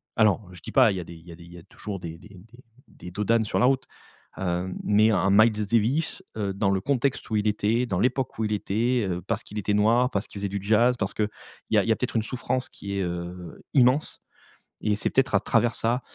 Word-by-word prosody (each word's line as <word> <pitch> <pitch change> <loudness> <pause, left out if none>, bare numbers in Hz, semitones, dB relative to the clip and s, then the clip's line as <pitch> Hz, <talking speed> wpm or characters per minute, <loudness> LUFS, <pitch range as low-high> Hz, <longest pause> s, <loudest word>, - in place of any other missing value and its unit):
Alors, 105 -3 +2
je 85 - -13
dis - - -8
pas, - - +5
il - - -4
y - - -3
a - - -6
des 85 - -11
il 80 +1 -16
y 85 - -9
a - - -10
des 85 - -14
il 85 - -15
y 90 - -10
a 85 - -12
toujours 100 +1 -7
des 85 -1 -7
des 100 +3 -16 0.2
des 120 +3 -18 0.2
des 90 -4 -11
dos 105 +3 -3
d'âne 115 +1 +3
sur - - -1
la - - +4
route, 135 0 +2 0.5
heu, 90 0 -2
mais 105 +2 +4
un 95 -1 +2
Miles 110 0 +4
Davis, 120 - 0 0.2
heu, 100 -2 -2
dans 100 0 0
le 95 - +1
contexte 140 +1 0
où 110 - -1
il 105 +1 0
était, 110 +3 +1
dans 95 -3 -1
l'époque 130 0 0
où 110 - +1
il 105 - -1
était, 110 +3 0
heu, 90 0 -2
parce 110 +4 -2
qu'il 105 - -10
était 105 +1 -1
noir, 115 +5 +3
parce 100 +1 -2
qu'il 100 - -9
faisait 100 0 -2
du 100 0 -3
jazz, 115 +4 +4
parce 95 -1 -2
qu'il 105 -1 0 0.4
y - - +4
a - - +4
il - - -3
y - - +5
a - - +4
peut-être - - -4
une - - +3
souffrance 130 +1 -3
qui 100 0 -6
est, - - 0
heu, 85 0 -6
immense 130 +2 +3 0.7
et 105 -1 +2
c'est - - -1
peut-être 135 0 +1
à - - +5
travers 120 -1 +1
ça, 120 +3 0
105 Hz, 270 wpm, -25 LUFS, 95-120 Hz, 0.7 s, pas